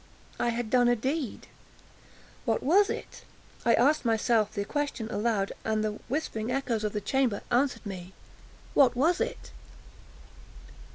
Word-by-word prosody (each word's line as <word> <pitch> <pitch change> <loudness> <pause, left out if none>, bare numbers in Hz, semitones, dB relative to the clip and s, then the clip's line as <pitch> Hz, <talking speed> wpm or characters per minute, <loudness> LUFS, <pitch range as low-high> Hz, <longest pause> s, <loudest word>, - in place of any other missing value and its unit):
I 240 - +1
had 235 -1 -3
done 245 -1 +5
a 245 - +4
deed—what 265 +2 -6
was 390 +8 +4
it? - - -6 0.4
I 235 - +5
asked 285 +6 +3
myself 225 -2 +2
the 200 - -3
question 285 -4 -2
aloud, 210 -2 0
and 220 -1 0
the 210 0 -2
whispering 240 -6 -2
echoes 250 -5 -1
of 210 - -1
the 210 - -2
chamber 255 -5 0
answered 250 0 +1
me,—"_What 195 +7 -2
was 325 +8 +2
it? - - -4
240 Hz, 130 wpm, -28 LUFS, 215-270 Hz, 0.4 s, done